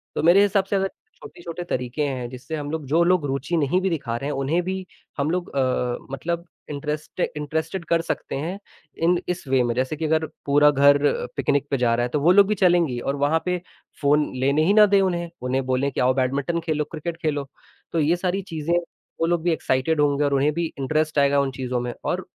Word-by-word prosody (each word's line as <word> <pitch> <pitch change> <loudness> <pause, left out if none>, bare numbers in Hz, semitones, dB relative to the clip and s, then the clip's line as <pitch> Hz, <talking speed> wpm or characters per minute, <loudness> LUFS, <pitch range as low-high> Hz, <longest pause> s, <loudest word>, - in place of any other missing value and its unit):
तो - - -1
मेरे 175 +4 +6
हिसाब 200 -1 +3
से 200 - -2
अगर 195 0 +1 0.3
छोटे-छोटे 175 0 -8
तरीके 125 -2 -2
हैं 130 -3 -3
जिससे 130 +5 -7
हम 145 0 -4
लोग, 160 -3 -4
जो 160 +6 +3
लोग 175 -3 +2
रुचि 140 +4 -1
नहीं 150 +4 +2
भी 190 - +1
दिखा 140 -9 -2
रहे 140 +4 -4
हैं - - -2
उन्हें 150 +6 +1
भी 185 +1 -4 0.3
हम 145 +3 0
लोग 180 -1 -2
अ, 125 -2 0 0.2
मतलब 170 +4 -3 0.3
इंटरेस्ट 150 +3 -5 0.2
इंटरेस्टेड 160 +4 -3
कर 170 -1 +3
सकते 165 - -4
हैं, 170 +8 -4 0.4
इन 175 +2 +2
इस 180 -5 -3
वे 130 -1 +3
में 120 -1 0
जैसे 130 +4 -1
कि 160 +1 -3
अगर 160 +1 +1 0.2
पूरा 145 +1 +5
घर 140 0 +5 0.4
पिकनिक 145 0 0
पे 140 - +2
जा 120 -2 +2
रहा 120 - 0
है 120 - -1
तो 150 - +2
वो 170 +4 +5
लोग 200 +1 +6
भी 210 - +1
चलेंगी 175 -9 +2
और 135 +3 -2
वहाँ 145 +3 +1
पे 180 0 0 0.4
फ़ोन 150 +1 +2
लेने 140 +4 +2
ही 200 - +4
ना 210 0 +8
दें 200 -1 +4
उन्हें 175 -2 -1
उन्हें 130 +1 -1
बोलें 130 +2 0
कि - - -4
आओ 125 +1 +3
बैडमिंटन 135 +6 0
खेलो 155 -2 0
क्रिकेट 165 +1 -5
खेलो। 145 -3 -1 0.4
तो 165 - 0
ये 155 +3 +3
सारी 185 +2 -1
चीज़ें 165 -2 -3 0.5
वो - - +4
लोग 175 -1 +1
भी 175 - +2
एक्साइटेड 150 0 0
होंगे 145 0 +2
और 140 - +1
उन्हें 140 +2 +3
भी 170 +2 -1
इंटरेस्ट 155 +2 0
आएगा 140 0 +4
उन 140 -1 0
चीज़ों 125 -1 -3
में 120 0 -3
और - - -1
150 Hz, 225 wpm, -23 LUFS, 135-170 Hz, 0.5 s, ना